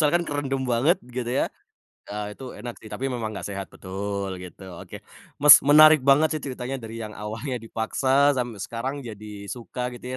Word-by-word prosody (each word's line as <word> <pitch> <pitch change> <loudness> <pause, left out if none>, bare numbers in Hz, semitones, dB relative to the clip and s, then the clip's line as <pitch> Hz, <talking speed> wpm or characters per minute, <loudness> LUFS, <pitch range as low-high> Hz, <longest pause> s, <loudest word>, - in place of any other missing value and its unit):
misalkan 160 +3 +3
kerendem 140 -3 -2
banget 140 +10 +3 0.2
gitu 120 -2 -2
ya, 130 - +1 0.7
ah, 105 0 -4
itu 135 - -11
enak 120 -1 -6
sih 110 - -11
tapi 135 - -3
memang 120 -4 -3
nggak 110 - -6
sehat 100 -1 -5
betul 100 0 -4
gitu 90 +1 -11 0.2
oke - - -10 0.5
Mas, 150 - +12
menarik 155 +1 +8
banget 140 +4 +5
sih 155 - -3
ceritanya 130 0 -4
dari 115 0 -7
yang 110 -2 -6
awalnya 110 +6 -5
dipaksa 135 +5 +2
sampe 120 -4 -3
sekarang 115 +7 -4
jadi 105 -1 -9 0.3
suka 125 +1 -5
gitu 120 - -12
125 Hz, 175 wpm, -25 LUFS, 110-140 Hz, 0.7 s, Mas